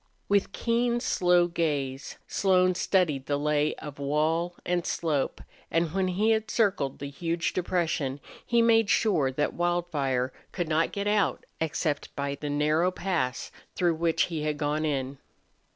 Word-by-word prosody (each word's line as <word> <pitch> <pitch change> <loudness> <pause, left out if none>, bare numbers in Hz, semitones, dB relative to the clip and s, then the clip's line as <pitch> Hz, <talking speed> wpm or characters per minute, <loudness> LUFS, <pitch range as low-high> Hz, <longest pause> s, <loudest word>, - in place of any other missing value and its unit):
With 200 -1 +2
keen, 235 +2 0
slow 180 -7 +3
gaze 145 -6 -2
Slone 185 -2 +3
studied 170 -7 +1
the 145 - +1
lay 150 0 +1
of 145 -2 -9
wall 160 +5 0
and 175 -1 0
slope, 155 -6 -1 0.3
and 165 -1 0
when 190 -1 +1
he 205 +5 +2
had 220 -1 0
circled 190 - +1
the 140 - -6
huge 165 +3 -2
depression 165 -6 -1 0.2
he 235 -1 +3
made 225 -2 +4
sure 170 -14 +2
that 145 +3 -1
Wildfire 150 -8 0 0.2
could 175 -3 -2
not 160 +1 +1
get 200 0 -3
out 205 -3 +1
except 155 -2 -2
by 140 0 -2
the 145 +1 -5
narrow 150 +4 +2
pass 175 -9 -2 0.2
through 175 -2 +2
which 165 0 +1
he 165 -3 -3
had 150 -1 -1
gone 150 +1 -1
in. 135 -2 -2
165 Hz, 150 wpm, -27 LUFS, 145-185 Hz, 0.3 s, made